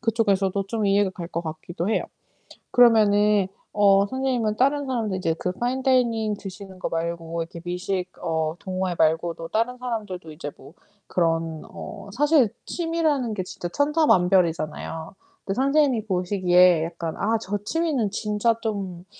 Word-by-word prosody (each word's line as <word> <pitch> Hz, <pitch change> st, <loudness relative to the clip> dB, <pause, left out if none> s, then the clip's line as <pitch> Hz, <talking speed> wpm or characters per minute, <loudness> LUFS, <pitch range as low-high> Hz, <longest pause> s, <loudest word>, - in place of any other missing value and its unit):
그쪽에서도 200 Hz, -4 st, +1 dB
좀 220 Hz, -2 st, -1 dB
이해가 200 Hz, 0 st, +3 dB
갈 175 Hz, -2 st, -7 dB
것 170 Hz, -1 st, -3 dB
같기도 165 Hz, +3 st, -5 dB
해요. -, -, +1 dB, 0.7 s
그러면은 210 Hz, -4 st, +5 dB, 0.3 s
어 200 Hz, -1 st, +5 dB
선생님은 250 Hz, -4 st, -1 dB
다른 280 Hz, +2 st, +2 dB
사람들 225 Hz, -7 st, -1 dB
이제 165 Hz, -3 st, 0 dB
그 180 Hz, -, -2 dB
파인 245 Hz, +6 st, -2 dB
다이닝 235 Hz, -5 st, +2 dB
드시는 195 Hz, -1 st, -9 dB
거 -, -, -3 dB
말고 165 Hz, 0 st, -3 dB
이렇게 165 Hz, +1 st, -8 dB
미식 180 Hz, +1 st, -3 dB
어 160 Hz, -1 st, -1 dB
동호회 185 Hz, -1 st, -2 dB
말고도 165 Hz, +1 st, +1 dB
다른 245 Hz, +3 st, -1 dB
사람들도 210 Hz, -9 st, -5 dB
이제 150 Hz, -1 st, -6 dB
뭐 160 Hz, -, -15 dB, 0.3 s
그런 165 Hz, -2 st, 0 dB
어 200 Hz, -, -9 dB
사실 290 Hz, -3 st, +4 dB, 0.2 s
취미라는 320 Hz, -8 st, 0 dB
게 185 Hz, -, -2 dB
진짜 175 Hz, -1 st, -6 dB
천차만별이잖아요. 180 Hz, -, +1 dB, 0.3 s
근데 195 Hz, -, -2 dB
선생님이 275 Hz, -4 st, +2 dB
보시기에 180 Hz, -3 st, +3 dB
약간 165 Hz, -1 st, -5 dB
'아 225 Hz, +2 st, +1 dB
저 205 Hz, -1 st, -3 dB
취미는 300 Hz, -8 st, 0 dB
진짜 210 Hz, +2 st, +1 dB
좀, 195 Hz, -5 st, -4 dB
200 Hz, 330 characters per minute, -24 LUFS, 175-235 Hz, 0.7 s, 그러면은